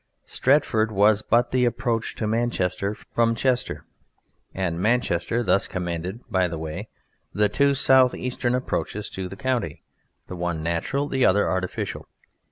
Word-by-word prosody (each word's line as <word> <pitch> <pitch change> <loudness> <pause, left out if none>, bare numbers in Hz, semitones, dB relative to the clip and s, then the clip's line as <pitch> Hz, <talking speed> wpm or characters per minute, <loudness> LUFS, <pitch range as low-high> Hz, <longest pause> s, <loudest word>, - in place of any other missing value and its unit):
Stretford 130 -6 +2
was 105 +1 +4
but 120 +2 +2
the 125 -1 +2
approach 120 -1 -1
to 110 - -3
Manchester 105 -3 -1
from 115 +1 0
Chester 125 +1 -1 0.7
and 90 -3 -2
Manchester 115 0 +1
thus 95 -2 +2
commanded 90 +3 -4
(by 95 -5 +1
the 85 -1 -5
way) 80 0 -6 0.5
the 105 +1 +3
two 140 +6 +2
south 130 -2 +5
eastern 125 -1 -1
approaches 105 -4 -3
to 95 -1 -5
the 95 - -8
county, 120 - -2 0.4
the 90 - -8
one 85 -2 -3
natural, 85 - -1
the 135 -3 0
other 100 +2 +4
artificial. 95 -1 -3
105 Hz, 145 wpm, -24 LUFS, 90-125 Hz, 0.7 s, south